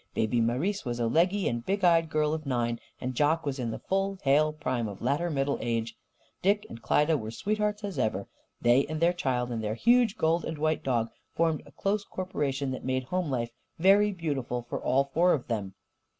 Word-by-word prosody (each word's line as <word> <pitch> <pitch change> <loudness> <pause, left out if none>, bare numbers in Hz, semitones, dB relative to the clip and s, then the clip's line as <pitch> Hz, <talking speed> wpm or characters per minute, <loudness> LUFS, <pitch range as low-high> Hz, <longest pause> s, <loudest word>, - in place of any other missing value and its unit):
Baby 115 +2 +1
Marise 135 - 0
was 120 -2 -3
a 120 - +1
leggy 180 - +2
and 120 -1 -2
big 200 +5 -1
eyed 165 -2 +4
girl 155 0 +1
of 155 -2 -4
nine, 120 -2 0 0.2
and 130 0 -3
Jock 155 +5 +2
was 140 -1 -2
in 120 -2 -2
the 110 - -4
full 195 +1 -1
hale 150 +3 +4
prime 130 -6 -2
of 100 -2 -7
latter 145 +8 0
middle 140 -2 0
age. 115 -1 -2 0.5
Dick 205 +2 +2
and 115 - -9
Klyda 150 +7 +2
were 110 - -5
sweethearts, 210 - -1
as 195 -8 -4
ever. 105 -5 -1 0.3
They 120 +3 +4
and 155 +1 -3
their 170 +2 +3
child 125 -7 -1
and 115 -2 -3
their 105 +1 -1
huge 235 - +3
gold 165 +2 +2
and 160 - -4
white 155 +1 0
dog 115 -3 0 0.2
formed 165 -2 +1
a - - -15
close 200 +1 -1
corporation 145 -9 -2
that 130 - -5
made 130 0 -1
home 180 +4 -2
life 120 -3 -2 0.3
very 200 +4 +5
beautiful 140 -9 -3
for - - -4
all 140 +1 +1
four 175 +2 +4
of 135 - -2
them. 100 -5 -3
145 Hz, 205 wpm, -28 LUFS, 120-175 Hz, 0.5 s, very